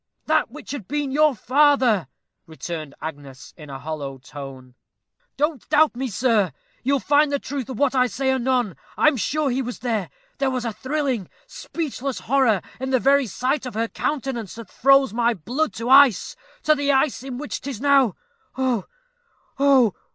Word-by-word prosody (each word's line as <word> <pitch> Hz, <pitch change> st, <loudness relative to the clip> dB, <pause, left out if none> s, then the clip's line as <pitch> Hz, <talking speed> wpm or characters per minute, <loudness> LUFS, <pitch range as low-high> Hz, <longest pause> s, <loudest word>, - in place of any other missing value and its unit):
"That 310 Hz, -4 st, +2 dB
which 300 Hz, +6 st, -10 dB
had 265 Hz, -10 st, -6 dB
been 290 Hz, -1 st, -2 dB
your 300 Hz, 0 st, +3 dB
father," 260 Hz, -, +3 dB, 0.4 s
returned 160 Hz, -2 st, -7 dB
Agnes, 140 Hz, -4 st, -8 dB
in 150 Hz, -2 st, -12 dB
a 135 Hz, -, -6 dB
hollow 140 Hz, -2 st, -6 dB
tone. 130 Hz, -1 st, -10 dB, 0.6 s
"Don't 295 Hz, -2 st, -1 dB
doubt 305 Hz, -3 st, +4 dB
me, 260 Hz, +2 st, -2 dB
sir 220 Hz, -2 st, +1 dB, 0.3 s
you'll 275 Hz, +1 st, +1 dB
find 290 Hz, +2 st, +3 dB
the 285 Hz, -, +1 dB
truth 270 Hz, -3 st, -5 dB
of 255 Hz, -, -5 dB
what 280 Hz, 0 st, +2 dB
I 255 Hz, -1 st, +3 dB
say 265 Hz, +2 st, -1 dB
anon. 250 Hz, -6 st, 0 dB, 0.2 s
I -, -, +6 dB
am 305 Hz, -, -3 dB
sure 280 Hz, +5 st, 0 dB
he 260 Hz, +2 st, 0 dB
was 245 Hz, -1 st, -5 dB
there. 220 Hz, -7 st, -2 dB, 0.3 s
There 275 Hz, -1 st, +2 dB
was 255 Hz, -2 st, -3 dB
a 230 Hz, -, -2 dB
thrilling, 260 Hz, -, -2 dB, 0.2 s
speechless 275 Hz, -5 st, -5 dB
horror 245 Hz, -7 st, +2 dB, 0.2 s
in 265 Hz, +1 st, -3 dB
the 260 Hz, -1 st, +3 dB
very 275 Hz, +1 st, +3 dB
sight 255 Hz, +6 st, -1 dB
of 240 Hz, -, -8 dB
her 225 Hz, +1 st, 0 dB
countenance 255 Hz, -, -3 dB
that 230 Hz, -1 st, -10 dB
froze 275 Hz, -2 st, +4 dB
my 235 Hz, 0 st, +2 dB
old 175 Hz, -8 st, -16 dB
blood 295 Hz, +7 st, -1 dB
to 230 Hz, +1 st, -5 dB
ice 270 Hz, -7 st, +6 dB, 0.3 s
to 310 Hz, -, +5 dB
the 285 Hz, -1 st, +1 dB
ice 270 Hz, -1 st, +1 dB
in 260 Hz, -1 st, -6 dB
which 295 Hz, +2 st, -5 dB
'tis 265 Hz, -5 st, -6 dB
now 275 Hz, -5 st, +3 dB, 0.4 s
ough! 255 Hz, -6 st, 0 dB, 0.7 s
ough! 270 Hz, -7 st, +5 dB
260 Hz, 180 wpm, -23 LUFS, 220-280 Hz, 0.7 s, I